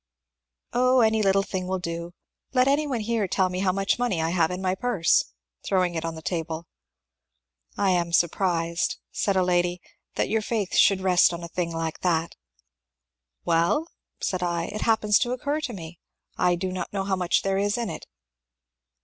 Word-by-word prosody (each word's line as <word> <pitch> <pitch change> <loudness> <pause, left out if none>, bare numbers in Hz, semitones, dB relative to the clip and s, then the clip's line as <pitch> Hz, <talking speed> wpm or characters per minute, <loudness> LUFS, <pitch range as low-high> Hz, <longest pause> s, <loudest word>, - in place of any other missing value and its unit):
^^ - - -64 0.7
Oh, 255 +1 +4
any 220 -1 +3
little 195 -1 +3
thing 190 -2 -4
will 190 0 -1
do. 170 0 -5 0.4
Let 255 0 +4
any 290 +2 +2
one 250 -5 -2
here 220 -2 0
tell 185 0 +1
me 180 0 -3
how 190 -1 +2
much 195 +4 0
money 240 -8 0
I 160 +1 0
have 170 -3 +2
in 180 0 -4
my 185 -1 0
purse 195 -5 +2 0.2
" - - -52
(throwing 185 -2 +1
it 165 -1 -3
on 165 0 -3
the 160 - -10
table). 160 +1 -3
^^ - - -25 1.1
I 195 -2 +2
am 170 -1 +1
surprised," 170 0 +1
said 200 - 0
a 185 - +3
lady, 175 0 +1
^^ - - -24 0.3
that - - 0
your 220 0 +1
faith 210 -3 -2
should 195 -1 +4
rest 180 -2 +4
on 170 - -8
a - - -5
thing 170 0 -3
like 165 -1 -3
that." 170 -2 0 1.1
^^Well," 170 - +2 0.3
said 185 -1 -2
I, 170 -1 -1
^^it 215 - -5
happens 215 -2 +3
to 245 -1 0
occur 285 +4 -2
to 295 -5 -3
me. 170 -5 -9 0.4
I 180 0 +2
do 185 +1 -3
not 185 -1 -4
know 195 -1 -2
how 195 0 0
much 180 -2 +1
there 195 0 0
is 205 +3 0
in 230 -6 -2
it." - - -8
185 Hz, 200 wpm, -25 LUFS, 170-210 Hz, 1.1 s, Oh